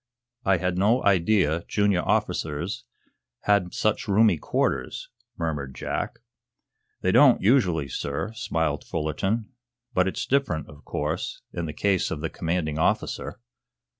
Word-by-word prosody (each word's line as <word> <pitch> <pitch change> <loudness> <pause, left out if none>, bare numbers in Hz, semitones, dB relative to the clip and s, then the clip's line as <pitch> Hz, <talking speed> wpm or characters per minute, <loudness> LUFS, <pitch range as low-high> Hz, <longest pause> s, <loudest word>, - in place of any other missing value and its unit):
"I 95 -1 +3
had 90 +1 -1
no 115 +6 +3
idea 90 -4 +3
junior 100 -3 +2
officers 75 -5 -1 0.6
had 100 -4 +2
such 110 +1 0
roomy 100 -4 +4
quarters," 65 -2 -1 0.3
murmured 75 -5 -3
Jack. - - -4 0.8
"They 95 - +2
don't, 135 +3 +6
usually, 95 - +3
sir," 70 - -3
smiled 80 - -1
Fullerton. 95 - -2 0.4
"But 90 0 +3
it's 95 - -2
different, 130 - 0
of 75 0 -14
course, - - -3
in 85 -1 -3
the - - -3
case 95 +2 +1
of 75 - -4
the 80 - -3
commanding 80 -2 -2
officer." - - -1
90 Hz, 130 wpm, -25 LUFS, 80-105 Hz, 0.8 s, don't